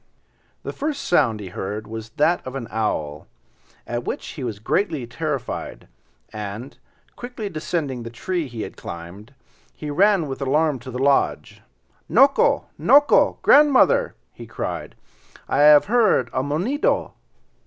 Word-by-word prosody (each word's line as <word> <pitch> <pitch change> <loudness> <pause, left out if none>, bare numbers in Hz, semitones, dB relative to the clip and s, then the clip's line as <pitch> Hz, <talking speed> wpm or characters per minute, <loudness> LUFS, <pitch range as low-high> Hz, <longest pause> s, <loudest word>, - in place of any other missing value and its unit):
The - - -5
first 300 0 -3
sound 130 -11 +2
he 100 -3 -7
heard 105 +4 -5
was 110 +1 -8
that 165 +4 +2
of 130 - -7
the 135 -4 -5
owl, 75 -9 -2 0.6
at 120 0 -4
which - - -5
he 145 - -7
was 115 -4 -4
greatly 150 - -1
terrified, 140 0 -5 0.5
and, 105 +4 -7 0.4
quickly 245 -4 -6
descending 155 -6 -3
the 115 - -7
tree 170 +7 -3
he 115 -4 -6
had - - -8
climbed, 95 +9 -10 0.4
he 150 -1 -6
ran 195 +2 +3
with 135 -1 -6
alarm 145 +1 +1
to 120 - -10
the 125 - -5
lodge. 135 +1 0 0.5
"Noko! 275 +1 +4
noko! 290 +1 +4
grandmother!" 300 - +5 0.2
he - - -11
cried. - - -5 0.5
"I - - 0
have 150 0 +7
heard 210 - +2
a 130 - 0
monedo." 175 - -1
140 Hz, 140 wpm, -22 LUFS, 115-180 Hz, 0.6 s, have